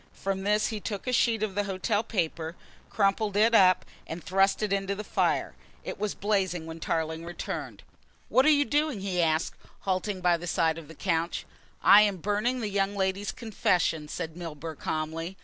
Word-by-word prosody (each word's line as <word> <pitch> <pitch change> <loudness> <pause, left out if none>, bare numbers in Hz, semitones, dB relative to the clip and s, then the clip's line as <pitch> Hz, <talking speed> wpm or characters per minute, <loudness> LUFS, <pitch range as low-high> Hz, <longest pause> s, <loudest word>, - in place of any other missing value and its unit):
From 195 0 -2
this 210 +2 +2
he 220 -2 -4
took 205 -1 -5
a 250 - -1
sheet 230 -2 +2
of 210 -3 -1
the 205 +1 0
hotel 200 +2 0
paper, 170 -6 -2 0.3
crumpled 205 0 +1
it 225 +2 +4
up 185 -4 +5 0.2
and 165 0 -6
thrust 195 +3 +2
it 205 -2 0
into 195 0 -1
the 210 - -5
fire. - - 0 0.3
It - - -6
was 210 -1 -2
blazing 190 -5 0
when 165 0 -8
Tarling 160 0 -2
returned. 175 +1 -6 0.4
"What 265 +3 +4
are - - +8
you 290 -1 +4
doing?" 295 -7 0
he 185 -2 0
asked, 160 0 +1 0.3
halting 190 +1 -1
by 175 -1 +3
the 175 +1 -7
side 160 -1 +1
of 160 - -12
the 160 - -12
couch. 170 0 -1 0.4
"I 205 - +9
am 205 -2 +2
burning 210 +7 0
the 215 - -2
young 200 0 0
lady's 190 +1 -1
confession," 180 -8 0
said 160 +1 -5
Milburgh 160 -2 -7
calmly. 165 +4 -3
195 Hz, 185 wpm, -28 LUFS, 165-210 Hz, 0.4 s, I